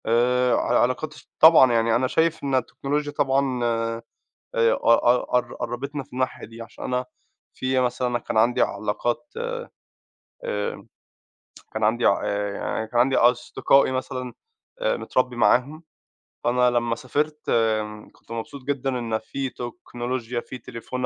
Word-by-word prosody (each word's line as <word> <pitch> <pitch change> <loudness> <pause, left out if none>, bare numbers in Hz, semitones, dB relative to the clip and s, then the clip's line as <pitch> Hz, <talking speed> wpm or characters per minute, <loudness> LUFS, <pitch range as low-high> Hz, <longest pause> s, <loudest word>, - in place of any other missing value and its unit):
آآ 125 +2 +3
ع - - 0
العلاقات، 130 +5 +1 0.2
طبعًا، 155 -6 +8
يعني 115 0 +2
أنا 130 +2 +2
شايف 160 +4 +1
إن 135 -1 0
التكنولوجيا 145 +3 -1
طبعًا، 135 -3 +1
آآ 115 0 -1 0.5
قَ 115 +2 +3
-قَ - - -12
قربِتنا 140 +4 -4
في 135 - -23
الناحية 130 0 -2
دي، 115 +1 -11
عشان 115 - -10
أنا 125 0 -1 0.5
في 130 0 0
مثلًا 125 0 0
أنا 120 0 -1
كان 110 - -3
عندي 120 +3 +3
علاقات 120 - -1 1.1
آآ 485 -1 -3 0.9
كان 110 0 -1
عندي 115 +3 +2
ع 100 - +4
آآ، 100 0 -1
يعني 110 +2 -3
كان 120 +2 +1
عندي 130 +2 +3
أصدقائي 125 +2 +3
مثلًا، 130 -1 -4 0.5
آآ - - +1
متربي 125 - -1
معاهم، 135 +6 +2 0.6
فأنا 125 +1 +3
لمّا 120 -1 0
سافرت 150 +5 -2 0.7
كُنت - - -20
مبسوط 115 +4 -6
جدًا 140 -1 -1
إن 115 -2 -1
في 135 +4 -4
تكنولوجيا، 120 -2 -5
في 130 - -8
تليفون 125 +2 -5
125 Hz, 140 wpm, -24 LUFS, 115-135 Hz, 1.1 s, طبعًا